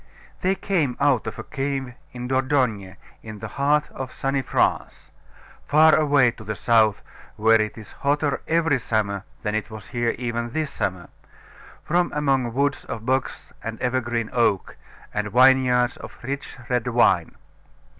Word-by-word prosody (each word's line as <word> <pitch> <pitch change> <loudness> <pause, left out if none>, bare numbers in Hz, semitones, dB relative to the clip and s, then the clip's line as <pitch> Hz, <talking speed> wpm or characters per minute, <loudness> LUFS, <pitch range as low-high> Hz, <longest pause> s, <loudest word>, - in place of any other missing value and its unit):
They 190 +1 +1
came 170 -9 -1
out 140 -5 +2
of - - -5
a - - -6
cave 135 -3 -3 0.2
in 125 0 -6
Dordogne, 130 - 0 0.3
in 110 -1 -9
the - - -6
heart 150 +2 +1
of 130 -1 -6
sunny 135 0 -1
France, - - -1 0.6
far 155 +2 +6
away 145 -5 +4
to 115 - -13
the 110 0 -4
south, 110 -3 +3 0.3
where 110 +1 +4
it 110 +1 -3
is 110 - -11
hotter 145 0 0
every 165 -4 +2
summer 105 -3 -1 0.2
than 105 - -1
it 110 +1 -2
was 110 +3 -10
here 120 -3 -1
even 120 -1 -3
this 155 -2 -2
summer, 95 -4 -3 0.7
from 175 +2 +1
among 135 -5 +1
woods 140 +1 0
of 115 -1 -6
box 130 +1 -2
and 115 -1 -5
evergreen 120 -2 -1
oak, 115 -6 +1 0.4
and 105 0 -2
vineyards 125 -1 +4
of - - -11
rich 140 +2 -5
red 125 -1 0
wine. 120 -1 +2
125 Hz, 155 wpm, -23 LUFS, 115-140 Hz, 0.7 s, far